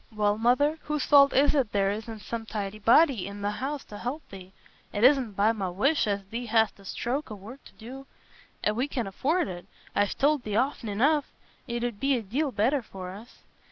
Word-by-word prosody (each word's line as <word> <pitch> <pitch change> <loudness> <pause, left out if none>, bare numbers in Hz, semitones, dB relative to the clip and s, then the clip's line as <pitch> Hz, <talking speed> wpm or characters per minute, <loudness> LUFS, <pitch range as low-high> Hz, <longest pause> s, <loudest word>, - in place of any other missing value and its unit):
"Well, 210 -1 0
Mother, 285 +7 +2
whose 300 -2 -1
fault 280 -1 +7
is 285 +2 +4
it 270 -7 0
there 195 -1 +2
isna 220 +1 -6
some 225 +1 -6
tidy 210 -1 -4
body 235 - +4
i' - - -8
th' 205 0 -6
house 275 +4 -3
t' 205 - -10
help 255 +8 -5
thee? 190 -1 -11 0.4
It 205 - -2
isna 265 -1 +5
by 205 +1 +2
my 200 -5 -3
wish 265 - +1
as 200 -1 -1
thee 235 +5 -5
hast 220 -2 +2
a 195 - -16
stroke 260 +9 -3
o' 215 - -6
work 220 +8 -12
to - - -15
do. 265 +4 -10 0.7
We 250 +5 -1
can 250 -5 -3
afford 275 - 0
it—I've 185 +2 -4
told 290 0 +2
thee 210 -3 -4
often 245 -2 0
enough. 280 +8 +2 0.4
It 235 0 -3
'ud 240 -4 -3
be 275 -1 +2
a 230 - -5
deal 270 +8 -1
better 250 +6 +1
for 185 -4 -8
us." 215 +6 -13
230 Hz, 205 wpm, -27 LUFS, 205-275 Hz, 0.7 s, fault